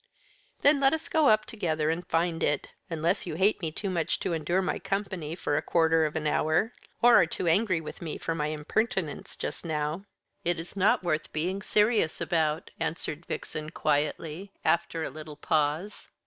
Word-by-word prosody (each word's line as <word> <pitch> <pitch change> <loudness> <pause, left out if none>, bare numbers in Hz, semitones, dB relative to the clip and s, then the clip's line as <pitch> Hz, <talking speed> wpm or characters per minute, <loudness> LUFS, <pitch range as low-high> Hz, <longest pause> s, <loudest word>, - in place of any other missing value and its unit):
"Then 285 0 +6
let 270 +1 +4
us 320 0 -2
go 315 -3 +4
up 215 0 +4
together 160 -7 -1
and 170 +2 -2
find 165 0 0
it 150 - 0 0.2
unless 170 +4 0
you 160 - -3
hate 195 +4 +2
me 160 -2 -2
too 200 +6 -4
much 170 -3 0
to - - -1
endure 165 +3 0
my - - -1
company 190 -5 -3
for 145 -4 -1
a - - +1
quarter 160 -1 +3
of 150 - -8
an 155 -1 -2
hour 160 +8 +2 0.3
or 240 0 +8
are 165 - +2
too 170 - -3
angry 185 +1 +3
with 155 - -9
me 160 -3 -4
for 165 - -2
my 150 -2 -1
impertinence 155 +2 -2
just - - -5
now." 155 +3 -2 0.4
"It 175 -1 +1
is 165 +4 -8
not 195 0 +3
worth 155 -3 -1
being 180 +6 -2
serious 210 -5 +2
about," 160 -2 0
answered 165 0 -3
Vixen 155 0 -4
quietly, 155 +5 -1
after 165 -1 +1
a - - -3
little 155 0 -9
pause. 155 +5 -1
165 Hz, 185 wpm, -28 LUFS, 155-190 Hz, 0.4 s, or